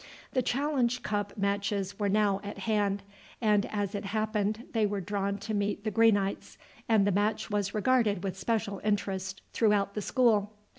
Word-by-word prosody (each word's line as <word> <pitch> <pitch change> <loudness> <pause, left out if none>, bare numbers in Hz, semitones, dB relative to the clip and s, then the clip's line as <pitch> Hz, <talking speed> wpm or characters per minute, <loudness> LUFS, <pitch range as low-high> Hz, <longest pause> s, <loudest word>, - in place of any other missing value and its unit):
The 255 - +1
challenge 255 -1 0
cup 205 -1 -2
matches 200 0 -1
were 205 -1 +1
now 200 -1 +2
at 205 +1 -6
hand, 205 -2 0 0.4
and 210 -3 +2
as 205 -1 -2
it 200 - -4
happened 215 +1 -1
they 225 -2 +1
were 205 -1 0
drawn 200 +1 -2
to 210 +2 -5
meet 205 0 -1
the 215 - -1
Greenites, 205 -2 +2 0.3
and 215 -3 +5
the 205 - +3
match 210 +3 0
was 205 -1 -1
regarded 215 -4 +2
with 195 -2 -2
special 200 0 -2
interest 195 -2 -2
throughout 210 -3 +2
the 210 - -3
school. 215 -3 +2
205 Hz, 165 wpm, -29 LUFS, 200-220 Hz, 0.4 s, and